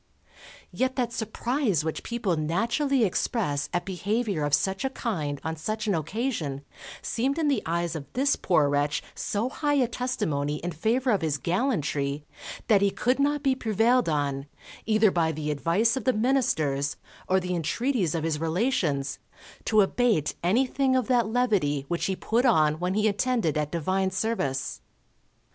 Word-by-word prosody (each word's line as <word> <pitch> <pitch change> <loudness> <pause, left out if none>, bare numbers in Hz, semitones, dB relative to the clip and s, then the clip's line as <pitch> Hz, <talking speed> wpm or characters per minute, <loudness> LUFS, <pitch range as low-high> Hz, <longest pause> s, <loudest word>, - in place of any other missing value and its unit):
Yet 260 +1 -1
that 240 -3 -1
surprise 220 - -1
which 160 - -3
people 230 -7 -1
naturally 230 - +1
express 180 - 0
at 175 - -1
behaviour 200 -1 -1
of 145 0 +3
such 190 - -1
a 265 - +1
kind 155 - -3
on 160 0 -2
such 215 +7 -3
an 205 - +1
occasion 165 - -2 0.4
seemed 265 +5 -1
in 315 -3 +1
the 280 - +1
eyes 170 0 -1
of 145 -3 -7
this 275 +3 +2
poor 160 -6 +2
wretch 145 0 0
so 210 +4 -2
high 290 +2 0
a 260 -4 +3
testimony 160 - -2
in 170 +4 -4
favour 235 - +1
of 200 -4 +2
his 155 -3 0
gallantry, 150 - -1 0.4
that 205 -3 +4
he 200 - +4
could 250 +6 0
not 290 +1 +1
be 270 -2 +3
prevailed 230 -2 +2
on, 140 -2 -1 0.4
either 215 -2 +4
by 165 -2 +1
the 150 -1 -3
advice 170 +11 +2
of 260 -5 -4
the 255 - +3
ministers, 210 - +1 0.3
or 190 +1 +4
the 180 0 -2
entreaties 180 - 0
of 160 - -1
his 160 -2 -1
relations, 160 - 0 0.5
to 215 -1 +4
abate 205 - +1
anything 260 +7 +2
of 255 -2 +2
that 245 -3 +3
levity 205 - +1
which 170 - -1
he 190 - 0
put 230 +6 0
on 155 - +3
when 180 +2 -1
he 215 +1 +3
attended 215 - +1
at 150 -1 -1
Divine 185 +3 0
Service. 185 -10 -2
195 Hz, 165 wpm, -26 LUFS, 155-245 Hz, 0.5 s, that